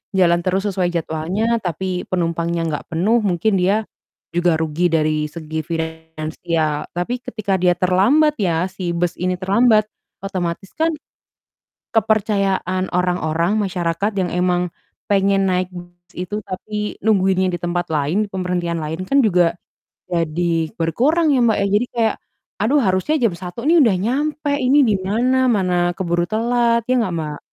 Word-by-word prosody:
jalan 175 Hz, -2 st, +4 dB
terus 190 Hz, +2 st, 0 dB
sesuai 180 Hz, -2 st, 0 dB
jadwalnya, 175 Hz, +8 st, -1 dB
tapi 180 Hz, +1 st, -2 dB
penumpangnya 170 Hz, -1 st, -1 dB
enggak 150 Hz, -2 st, -3 dB
penuh 205 Hz, +9 st, +2 dB
mungkin 195 Hz, +2 st, +1 dB
dia 205 Hz, +4 st, +1 dB, 0.5 s
juga 175 Hz, -1 st, +3 dB
rugi 160 Hz, +2 st, +1 dB
dari 155 Hz, -1 st, +1 dB
segi 160 Hz, -1 st, -5 dB
finansial. 160 Hz, -1 st, -3 dB
Tapi 205 Hz, +9 st, -3 dB
ketika 200 Hz, -3 st, -2 dB
dia 180 Hz, -1 st, +3 dB
terlambat 245 Hz, +13 st, +3 dB
ya, 180 Hz, -2 st, +1 dB
si 185 Hz, -2 st, -4 dB
bus 175 Hz, 0 st, -1 dB
ini 180 Hz, 0 st, 0 dB
terlambat, 215 Hz, +3 st, +3 dB, 0.4 s
otomatis 185 Hz, -1 st, -3 dB
kan 325 Hz, +1 st, +1 dB, 1.0 s
kepercayaan 195 Hz, -4 st, +1 dB
orang-orang, 175 Hz, +1 st, 0 dB
masyarakat 185 Hz, +1 st, -1 dB
yang 185 Hz, -2 st, -1 dB
emang 180 Hz, -1 st, 0 dB, 0.4 s
pengen 195 Hz, 0 st, +3 dB
naik 185 Hz, 0 st, +1 dB
bus 175 Hz, -1 st, -10 dB, 0.2 s
itu 185 Hz, +4 st, -4 dB
tapi 210 Hz, +2 st, -4 dB
nungguinnya 190 Hz, -3 st, +2 dB
di -, -, -6 dB
tempat 175 Hz, 0 st, -2 dB
lain, 155 Hz, +8 st, 0 dB
di -, -, -25 dB
pemberhentian 180 Hz, -3 st, -2 dB
lain 160 Hz, +4 st, -4 dB
kan 280 Hz, -, +3 dB
juga 175 Hz, -7 st, +3 dB, 0.5 s
jadi 165 Hz, -1 st, -1 dB
berkurang 285 Hz, -, +2 dB
ya, 255 Hz, -, +3 dB
Mbak, 220 Hz, -, +3 dB
ya. -, -, +2 dB
Jadi 210 Hz, +5 st, +2 dB
kayak, 225 Hz, -2 st, +1 dB, 0.5 s
"Aduh 275 Hz, +7 st, +3 dB
harusnya 190 Hz, +9 st, +1 dB
jam 225 Hz, -7 st, +2 dB
1.00 185 Hz, +7 st, -7 dB
nih 330 Hz, 0 st, +5 dB
udah 220 Hz, -7 st, +4 dB
nyampe, 290 Hz, +5 st, -1 dB
ini 275 Hz, +2 st, +4 dB
di 210 Hz, -3 st, +2 dB
mana? 250 Hz, +7 st, +1 dB
Mana 180 Hz, -4 st, +1 dB
keburu 175 Hz, -2 st, 0 dB
telat." 235 Hz, +1 st, +1 dB
Ya 255 Hz, -, +4 dB
nggak, 185 Hz, -5 st, -2 dB
Mbak? 150 Hz, -2 st, -4 dB
185 Hz, 150 wpm, -20 LUFS, 170-215 Hz, 1.0 s, nih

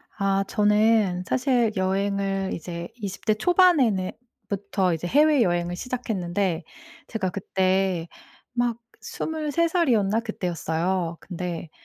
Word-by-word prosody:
아 195 Hz, -1 st, +1 dB
저는 210 Hz, -3 st, +3 dB
사실 250 Hz, -4 st, +2 dB
여행을 195 Hz, 0 st, 0 dB
이제 170 Hz, 0 st, -6 dB
20 200 Hz, -4 st, -7 dB
대 215 Hz, -, +4 dB
초반에는 270 Hz, -, +3 dB, 0.4 s
부터 195 Hz, -2 st, 0 dB
이제 165 Hz, +1 st, -4 dB
해외여행을 195 Hz, -, +3 dB
시작했는데 190 Hz, -7 st, -2 dB, 0.4 s
제가 215 Hz, -5 st, -2 dB
그때 185 Hz, -2 st, 0 dB, 0.5 s
막 240 Hz, -1 st, 0 dB, 0.2 s
23 320 Hz, +1 st, -1 dB
살이었나 230 Hz, -, +2 dB
그때였어요. 175 Hz, -4 st, -2 dB
근데 175 Hz, -3 st, -5 dB
195 Hz, 230 characters per minute, -25 LUFS, 180-235 Hz, 0.5 s, 대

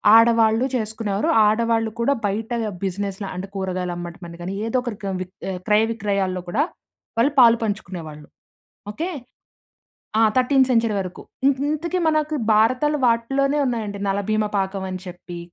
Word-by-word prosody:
ఆడవాళ్ళు 230 Hz, +1 st, +5 dB
చేసుకునేవారు. 220 Hz, -3 st, -1 dB, 0.2 s
ఆడవాళ్ళు 225 Hz, +1 st, +1 dB
కూడా 235 Hz, +4 st, +3 dB
బయట 215 Hz, +4 st, -2 dB, 0.3 s
బిజినెస్‌ల 195 Hz, +1 st, -3 dB
అంటే 185 Hz, +2 st, -5 dB
కూరగాయలమ్మడం 180 Hz, -2 st, -4 dB
అని 170 Hz, 0 st, -10 dB
గాని, 185 Hz, +3 st, -4 dB
ఏదో 230 Hz, +3 st, 0 dB
ఒకటి 240 Hz, -4 st, -5 dB
క్రమ్ 190 Hz, -2 st, -2 dB
విక్ 185 Hz, 0 st, -7 dB, 0.2 s
ఆహ్, 180 Hz, -, -4 dB
క్రయ 210 Hz, +1 st, +4 dB
విక్రయాల్లో 200 Hz, -4 st, -1 dB
కూడా 240 Hz, +11 st, +2 dB, 0.6 s
వాళ్ళు 265 Hz, +5 st, +4 dB
పాలు 235 Hz, -2 st, +7 dB
పంచుకునేవాళ్ళు. 175 Hz, -8 st, -5 dB, 0.6 s
ఓకె? 330 Hz, -, -3 dB, 1.1 s
ఆ! -, -, +5 dB, 0.2 s
13థ్ 260 Hz, +1 st, +4 dB
సెంచరీ 230 Hz, -3 st, +2 dB
వరకు. 185 Hz, -1 st, -7 dB, 0.3 s
ఇ -, -, +7 dB, 0.2 s
ఇంతకీ 340 Hz, +4 st, -1 dB
మనకు 310 Hz, -1 st, +1 dB, 0.2 s
భారతాలు 255 Hz, +8 st, +3 dB
వాటిలోనే 270 Hz, +5 st, +1 dB
ఉన్నాయండి 220 Hz, -5 st, -2 dB
'నలభీమ 205 Hz, +2 st, 0 dB
పాకం' 190 Hz, 0 st, -2 dB
అని 185 Hz, -, -4 dB
చెప్పి 175 Hz, -1 st, -8 dB
215 Hz, 140 wpm, -22 LUFS, 190-235 Hz, 1.1 s, పాలు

